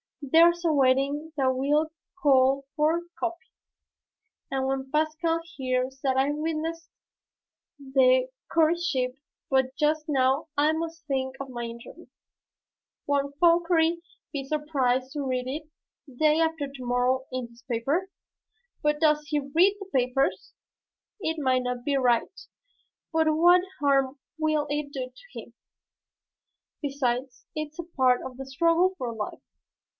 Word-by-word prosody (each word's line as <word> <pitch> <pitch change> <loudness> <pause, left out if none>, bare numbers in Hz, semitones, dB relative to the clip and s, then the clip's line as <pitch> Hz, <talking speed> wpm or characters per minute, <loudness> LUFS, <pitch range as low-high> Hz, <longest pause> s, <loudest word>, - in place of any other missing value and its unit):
There's 335 +4 +5
a 330 - +4
wedding 280 +3 +2
that 265 -2 +3
will 295 +4 +1 0.3
call 270 -1 +4
forth 320 +3 +2 0.2
copy, 350 +2 -4 1.0
and 265 -1 -1
when 265 0 -2
Pascal 315 +2 0 0.2
hears 255 0 -1
that 265 -2 +1
I 270 +2 +3
witnessed 320 +2 -3 0.9
the 260 -2 +3 0.2
courtship 320 -6 +1 0.3
but 265 -1 +1
just 305 +1 +1
now 270 0 +2
I 300 +2 +4
must 325 0 -4
think 265 -2 -2
of 275 -1 -6
my 240 -2 -5
interview. 235 0 -9 1.0
Won't 280 0 -1
Fauchery 335 -1 +3 0.3
be 280 -2 -3
surprised 270 -3 0
to 295 - -3
read 255 -2 -1
it 300 +4 -5 0.5
day 305 +2 +4
after 320 -3 0
to 275 -2 -9
morrow 250 +2 +1
in 255 -2 -4
his 235 +1 -20
paper? 280 +11 0 0.7
But 300 0 +1
does 300 -1 +3
he 300 -1 0
read 335 +9 +3
the 395 -1 -9
papers? 255 +1 0 0.7
It 320 -4 -2
may 260 -3 +2
not 250 -1 -3
be 285 - +1
right 245 +6 +1 0.7
but 320 0 +3
what 345 +3 +5 0.2
harm 275 -1 +2 0.2
will 310 -1 +1
it 290 -1 -3
do 255 -2 -4 0.2
him? - - -9 1.3
Besides, 265 -3 -2
it's 305 0 -5
a 345 - -4
part 260 -7 +2
of 255 -1 -8
the 270 - -6
struggle 335 +7 +2
for 240 -2 -4
life." 215 -2 -5
285 Hz, 135 wpm, -27 LUFS, 260-320 Hz, 1.3 s, There's